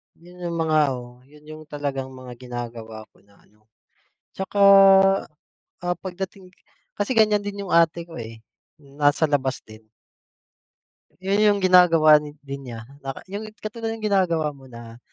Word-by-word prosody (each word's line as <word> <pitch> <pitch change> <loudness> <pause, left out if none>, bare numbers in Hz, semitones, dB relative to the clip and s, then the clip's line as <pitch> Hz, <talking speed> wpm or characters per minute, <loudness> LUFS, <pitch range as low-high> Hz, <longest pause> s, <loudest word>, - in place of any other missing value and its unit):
Yun 175 +1 -11
yung 170 - -3
mga 155 -1 +1 0.2
oo, 125 0 -10
yun 150 +2 -19
yung 155 +1 -11
talagang 140 -3 -4
mga 125 -2 -11
ginagawa 120 -3 -8
ko - - -28
na 100 - -25
ano, 105 +1 -31 0.7
tsaka, 190 +1 -5 1.2
ah, 175 +1 -2
pagdating 190 0 -7 0.5
kasi 205 +5 -1
ganiyan 215 -2 +3
din 200 0 -5
yung 195 - -8
ate 170 0 +3
ko 165 -5 -11
eh. 115 -1 -9 0.4
Nasa 145 +2 0
labas 135 -2 -1
din. 110 0 -16 1.4
Yun 195 +2 +1
yung 205 -1 +3
ginagawa 165 -4 +6
na 150 -1 -9
din 140 0 -7
niya 115 -1 -7 0.2
na 135 - -3 0.2
yung 205 +2 -5 0.2
katulad 225 +1 -4
ng 220 - -9
ginagawa 175 -6 +1
mo 135 -1 -16
na 115 -1 -12
155 Hz, 150 wpm, -23 LUFS, 130-185 Hz, 1.4 s, ginagawa